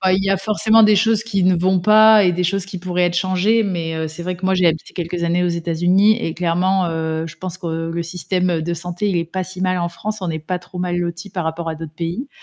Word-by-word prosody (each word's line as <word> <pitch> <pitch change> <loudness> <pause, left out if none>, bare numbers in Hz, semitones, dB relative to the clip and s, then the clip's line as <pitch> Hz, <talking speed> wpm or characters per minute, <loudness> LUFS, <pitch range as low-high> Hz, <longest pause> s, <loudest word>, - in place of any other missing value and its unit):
Ah 190 -1 +2
il 190 +1 +2
y 195 - 0
a 195 - +3
forcément 215 +3 +3
des 210 0 +5
choses 225 +2 +2
qui 200 -4 -1
ne 180 -1 +3
vont 185 +1 +2
pas 215 +2 +6
et 180 - +4
des 180 +1 -1
choses 195 +1 0
qui 190 -2 -7
pourraient 180 0 -1
être 175 0 -2
changées, 195 +5 +2
mais 165 -4 -3
c'est 160 +2 -6
vrai 180 0 -3
que 185 - -9
moi 190 0 +2
j'ai 180 -1 +3
habité 160 -1 -1
quelques 170 0 -3
années 175 +1 +1
aux 175 - +1
États-Unis 175 +5 +2
et 165 - -3
clairement, 180 +2 +1
heu, 160 0 -2
je 165 - -10
pense 185 -1 -6
que 165 -1 -4
le 170 0 -3
système 180 0 -1
de 170 +2 -2
santé 175 +4 -3
il 185 - 0
est 170 - 0
pas 185 +3 -4
si 185 0 -8
mal 185 -1 +1
en 170 0 -1
France, 210 +5 -5
on 180 -3 -2
est 160 - -3
pas 180 +3 -4
trop 180 0 -11
mal 180 -1 -1
lotis 175 +2 -4
par 180 -2 -3
rapport 160 +1 -4
à 160 - -2
d'autres 160 -1 -8
pays. 175 - -4
180 Hz, 275 wpm, -19 LUFS, 170-190 Hz, -, pas